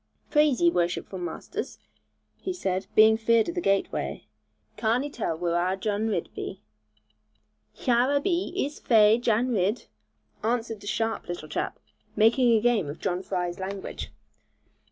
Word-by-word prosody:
'Plaise 300 -4 +4
ye, 345 0 +5
worshipful 175 - -1
masters,' 175 - -5 0.6
he 375 - -3
said, 190 - -2
being 220 0 +7
feared 230 +2 +3
of - - -3
the 350 - -2
gateway, 195 - -1 0.5
'carn 225 +4 +1
'e 290 - -5
tull 185 - -2
whur 170 0 -1
our 180 +2 +1
Jan 205 +2 -1
Ridd 195 -6 -1
be?' 190 - -6 1.2
'Hyur 250 +3 +3
a - - +4
be, 350 +4 -1
ees 295 -5 -2
fai, 220 -1 +5
Jan 240 +1 +1
Ridd,' 210 0 0 0.6
answered 225 -2 -1
a - - -9
sharp 225 +1 -1
little 175 -3 -5
chap, 150 - -3 0.4
making 230 +1 +4
game 225 -9 +2
of 145 - -6
John 180 -1 -1
Fry's 180 -2 -3
language. 190 +1 -5
220 Hz, 150 wpm, -26 LUFS, 190-245 Hz, 1.2 s, being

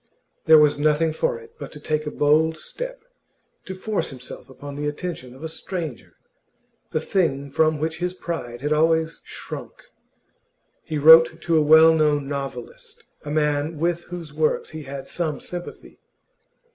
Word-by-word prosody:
There 160 0 +8
was 150 -1 +4
nothing 155 +2 +2
for 485 - 0
it 460 0 -16
but - - -7
to 150 - -10
take 155 0 -2
a - - 0
bold 155 +2 +2
step, - - -7 0.6
to 190 - -6
force 210 +2 -2
himself 130 0 -10
upon 140 +2 -9
the 145 +1 -3
attention 145 -5 -5
of 135 - -13
a - - -2
stranger 160 -4 -6 0.7
the 155 - -1
thing 140 -6 -1
from 155 +2 +2
which 160 +2 -3
his 180 +1 -2
pride 125 -10 -5
had 150 +2 +1
always 160 +1 +1
shrunk. - - -8 1.1
He 155 - -4
wrote 160 +2 +7
to 170 - +1
a 155 - +5
well 160 +2 +7
known 150 -3 +2
novelist 455 - -7 0.2
a - - -5
man 150 +1 0
with 170 +2 -1
whose 170 -4 -8
works 155 0 0
he 155 0 -7
had 135 0 -7
some 160 -4 -2
sympathy. 175 0 -9
155 Hz, 160 wpm, -23 LUFS, 145-170 Hz, 1.1 s, There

